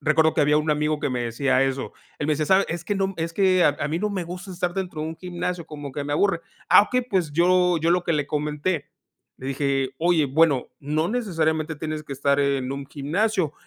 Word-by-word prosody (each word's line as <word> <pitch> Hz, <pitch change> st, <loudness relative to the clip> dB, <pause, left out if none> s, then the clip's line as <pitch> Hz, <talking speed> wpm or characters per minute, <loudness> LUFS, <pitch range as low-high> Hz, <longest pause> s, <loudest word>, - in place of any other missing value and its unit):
Recuerdo 160 Hz, +1 st, +3 dB
que -, -, +2 dB
había 150 Hz, +1 st, +4 dB
un 155 Hz, 0 st, 0 dB
amigo 150 Hz, 0 st, 0 dB
que 140 Hz, -, -1 dB
me 125 Hz, -1 st, -1 dB
decía 130 Hz, +3 st, +1 dB
eso, 135 Hz, 0 st, -3 dB, 0.3 s
él 145 Hz, -, -2 dB
me 155 Hz, -, +2 dB
decía: 150 Hz, 0 st, -1 dB
"¿Sabes? 190 Hz, +1 st, +4 dB
Es 170 Hz, +1 st, -4 dB
que 205 Hz, -, -1 dB
no, 195 Hz, -1 st, -1 dB
es 165 Hz, 0 st, -3 dB
que 185 Hz, -1 st, +3 dB
a 145 Hz, -, +3 dB
a 145 Hz, -, -1 dB
mí 160 Hz, +3 st, -1 dB
no 210 Hz, +2 st, 0 dB
me 195 Hz, -3 st, -3 dB
gusta 180 Hz, +3 st, -8 dB
estar 175 Hz, 0 st, -2 dB
dentro 180 Hz, -5 st, -4 dB
de 160 Hz, -, -3 dB
un 160 Hz, -, -7 dB
gimnasio, 180 Hz, -1 st, -4 dB
como 145 Hz, -2 st, -7 dB
que 145 Hz, +1 st, -4 dB
me 145 Hz, -, -3 dB
aburre". 170 Hz, +1 st, +2 dB, 0.3 s
Ah, -, -, +8 dB
okey, 250 Hz, +4 st, 0 dB
pues 185 Hz, -11 st, -1 dB
yo 180 Hz, +1 st, +3 dB
yo 165 Hz, +2 st, +1 dB
lo 175 Hz, 0 st, +2 dB
que 170 Hz, -, +1 dB
le 145 Hz, -2 st, 0 dB
comenté, 150 Hz, +3 st, -2 dB, 0.5 s
le 130 Hz, -, -8 dB
dije: 135 Hz, -1 st, 0 dB
"Oye, 165 Hz, -3 st, +3 dB
bueno, 140 Hz, -2 st, +2 dB
no 155 Hz, +3 st, -1 dB
necesariamente 160 Hz, -9 st, -1 dB
tienes 155 Hz, +1 st, -4 dB
que 140 Hz, -, -7 dB
estar 140 Hz, +1 st, +1 dB
en 140 Hz, -2 st, 0 dB
un 140 Hz, 0 st, -5 dB
gimnasio, 165 Hz, +4 st, -1 dB
155 Hz, 235 wpm, -24 LUFS, 145-180 Hz, 0.5 s, Ah